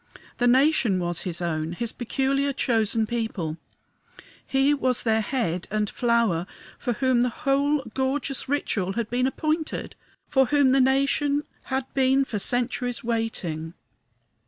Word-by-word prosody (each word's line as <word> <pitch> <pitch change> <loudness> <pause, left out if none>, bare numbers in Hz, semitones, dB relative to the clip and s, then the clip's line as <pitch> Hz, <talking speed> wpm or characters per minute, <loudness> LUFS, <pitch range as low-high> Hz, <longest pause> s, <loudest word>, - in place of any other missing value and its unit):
The 245 - +3
nation 260 -5 +4
was 175 -1 -2
his 175 +1 -4
own, 160 -1 -2
his 230 +5 -3
peculiar, 275 +3 0
chosen 225 -4 +1
people; 215 -9 -3 0.9
he 270 +2 +2
was 255 -3 0
their 220 -1 +2
head 205 -8 -2
and 210 0 0
flower, 230 -8 +1 0.3
for 245 - -1
whom 255 +1 +2
the 250 - +2
whole 280 +2 +1
gorgeous 270 0 -1
ritual 200 -9 0
had 230 +1 -3
been 250 +1 +2
appointed, 310 +3 -2 0.3
for 265 -2 +3
whom 285 -1 +4
the 270 0 +4
nation 275 +2 +2 0.2
had 265 -1 -2
been 270 0 +3
for 215 -5 -3
centuries 245 +2 -1
waiting. 190 -9 -3
245 Hz, 135 wpm, -25 LUFS, 215-270 Hz, 0.9 s, nation